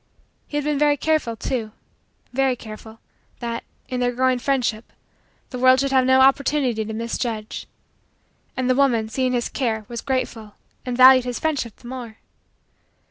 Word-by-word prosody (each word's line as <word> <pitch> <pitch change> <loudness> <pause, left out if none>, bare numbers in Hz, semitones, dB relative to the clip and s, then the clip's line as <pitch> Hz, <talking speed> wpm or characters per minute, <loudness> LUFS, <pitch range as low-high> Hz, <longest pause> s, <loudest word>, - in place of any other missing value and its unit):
He 295 - -4
had 295 - -1
been 295 -1 0
very 295 -1 +3
careful, 310 -7 0
too 225 -2 -3 0.6
very 265 0 +2
careful 220 0 -11 0.4
that, 235 -1 -4 0.2
in 255 - -3
their 245 0 +1
growing 255 +1 +1
friendship, 245 -4 -1 0.6
the 250 - -5
world 255 +1 +6
should 275 0 0
have 260 -1 +3
no 260 0 +5
opportunity 270 -3 +2
to 220 - -6
misjudge. 230 -1 -4 0.9
And 255 -1 0
the 255 - +4
woman, 245 -5 +2
seeing 255 +2 0
his 240 -1 0
care, 220 -5 -2
was 235 -1 -6
grateful 235 -5 -3 0.3
and 245 -1 -2
valued 255 0 +8
his 245 -1 -3
friendship 280 -8 -2
the 240 - -14
more. 240 -3 -7
250 Hz, 160 wpm, -22 LUFS, 230-265 Hz, 0.9 s, valued